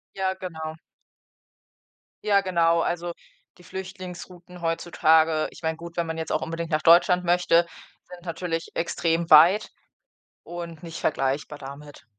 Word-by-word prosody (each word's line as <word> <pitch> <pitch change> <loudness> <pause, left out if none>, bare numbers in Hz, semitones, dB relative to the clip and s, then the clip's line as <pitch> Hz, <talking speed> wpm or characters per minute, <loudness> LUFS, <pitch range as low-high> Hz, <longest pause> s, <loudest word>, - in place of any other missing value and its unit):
Ja, 190 -1 -1
genau. 160 -4 -6 1.5
Ja, 200 -2 +3
genau. 170 -3 +2
Also, 175 0 -2 0.4
die - - -16
Flüchtlingsrouten 180 -1 -9
heutzutage 160 -1 +2
ich - - -15
meine 160 0 -1
gut, 170 0 -10
wenn 170 -1 0
man 160 0 -4
jetzt 160 - -3
auch 155 - 0
unbedingt 165 0 -4
nach 155 -1 0
Deutschland 180 +2 +5
möchte, 175 -1 +3 0.4
sind 180 -1 -12
natürlich 165 -1 -4
extrem 165 0 -1
weit 170 +7 +7 0.7
und 170 -1 -8
nicht 165 -1 -7
vergleichbar 140 +1 -1
damit. 140 +1 -11
170 Hz, 135 wpm, -25 LUFS, 160-180 Hz, 1.5 s, weit